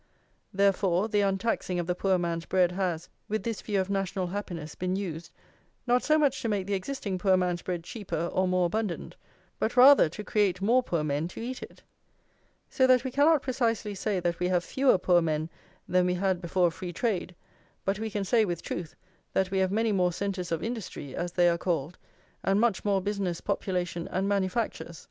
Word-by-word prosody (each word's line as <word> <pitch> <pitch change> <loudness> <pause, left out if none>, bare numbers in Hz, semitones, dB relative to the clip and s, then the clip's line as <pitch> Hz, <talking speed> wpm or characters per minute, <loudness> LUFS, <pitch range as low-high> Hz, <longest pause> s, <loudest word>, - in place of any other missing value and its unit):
Therefore, 195 -1 +2
the 210 -2 +1
untaxing 195 -2 0
of 175 - -1
the 180 - 0
poor 190 +1 +1
man's 170 -1 -2
bread 180 -2 +3
has, 180 -3 -2 0.2
with 215 +1 -1
this 230 -3 -3
view 205 -2 -1
of 190 - 0
national 195 -1 -1
happiness, 175 -5 -5
been 185 +1 -2
used, 170 -4 -5 0.6
not 245 0 +3
so 310 0 +3
much 285 -3 +2
to 230 - -1
make 200 -3 -1
the 200 - -2
existing 195 -2 -3
poor 190 -1 +4
man's 180 -2 0
bread 175 -2 -4
cheaper 175 -5 -4
or 185 0 +2
more 185 -1 +2
abundant, 200 0 -3 0.4
but 235 - -1
rather 265 - +8
to 210 +6 -7
create 205 -4 +1
more 235 +6 +3
poor 170 -10 -1
men 150 +2 -1
to 175 - -10
eat 250 +3 -5
it; - - -11 0.8
so 260 - +2
that 255 -1 +5
we 260 - -3
cannot 290 +2 +4
precisely 230 -5 -1
say 200 0 -1
that 170 -1 -1
we 180 - +1
have 180 -1 +1
fewer 265 +2 +3
poor 180 -1 +3
men 160 0 -1 0.4
than 180 0 +3
we 180 - +1
had 185 -1 0
before 175 0 +2
free 180 +1 -6
trade, 185 -2 -2 0.5
but 195 +1 0
we 220 0 -3
can 205 -1 -2
say 225 +3 +3
with 175 -4 -3
truth 170 -3 -5 0.4
that 190 -1 +1
we 190 - +1
have 190 0 +1
many 220 +2 +1
more 180 -3 +2
centres 185 -1 -3
of 165 -1 -1
industry, 220 - -5
as 175 0 -3
they 175 -1 +4
are 170 0 +2
called, 170 -2 -2 0.4
and 195 +1 +2
much 230 -3 +1
more 200 -2 +1
business, 200 -4 -2
population, 175 -2 -2
and 190 +2 -1
manufactures. 195 -3 -1
190 Hz, 200 wpm, -28 LUFS, 175-210 Hz, 0.8 s, rather